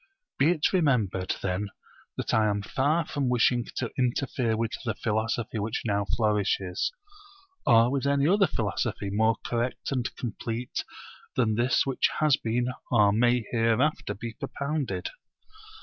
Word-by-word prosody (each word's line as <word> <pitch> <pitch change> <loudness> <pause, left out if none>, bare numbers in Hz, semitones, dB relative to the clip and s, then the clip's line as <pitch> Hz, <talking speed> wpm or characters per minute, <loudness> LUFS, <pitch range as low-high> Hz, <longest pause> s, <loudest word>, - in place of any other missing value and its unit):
Be 140 - +5
it 170 0 +1
remembered 115 - +1
then 95 +2 -1 0.5
that - - -2
I 110 -1 +4
am 100 0 -1
far 145 +9 +1
from 140 -4 -1
wishing 120 -1 +2
to 120 - -2
interfere 125 -2 0
with 115 0 -1
the 110 -4 -2
philosophy 110 +1 -1
which 105 +2 -2
now 100 -2 +1
flourishes, 100 -4 0 0.8
or 115 +1 +6
with 140 0 0
any 140 0 +3
other 195 +2 +4
philosophy 105 -2 -2
more 110 +2 +3
correct 120 +3 -2
and 125 -3 0
complete 115 +1 -4 0.5
than 115 -4 +2
this 120 +4 +2
which 135 -2 +1
has 155 -3 +4
been 120 +2 -1 0.2
or 105 -4 +5
may 120 +2 +2
hereafter 115 0 +1
be 115 +2 -6
propounded. 140 +4 -3
120 Hz, 140 wpm, -27 LUFS, 110-130 Hz, 0.8 s, or